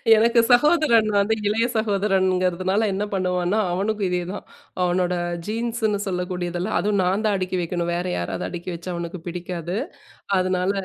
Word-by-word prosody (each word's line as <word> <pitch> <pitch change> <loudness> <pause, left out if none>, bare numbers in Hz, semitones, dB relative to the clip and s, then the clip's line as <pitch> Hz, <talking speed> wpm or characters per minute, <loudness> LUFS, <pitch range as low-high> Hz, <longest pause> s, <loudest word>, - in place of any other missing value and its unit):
எனக்கு 230 +2 +4
சகோதரன் 245 -5 +4
வந்து 200 +2 +3
இளைய 220 +3 +2
சகோதரன்ங்கிறதுனால, 190 -1 +1
என்ன 195 +2 -1
பண்ணுவான்னா, 180 +1 0
அவனுக்கும் 200 +3 -1
இதேதான். 180 +2 -3 0.4
அவனோட 180 0 +1 0.3
ஜீன்ஸுன்னு 225 -1 -1
சொல்லக்கூடியதெல்லாம் 180 +1 -2
அதுவும் 205 -1 +1
நான் 190 +4 +1
தான் 210 -2 +2
அடுக்கி 185 0 -2
வைக்கணும். 170 0 -2
வேறு 180 +1 -2
யாராவது 90 +1 -3
அடுக்கி 175 +1 -6
வச்சா 170 +2 -7
அவனுக்கு 170 +1 -5
பிடிக்காது. 175 0 -4 0.6
அதனால 185 0 +1
185 Hz, 135 wpm, -23 LUFS, 180-215 Hz, 0.6 s, எனக்கு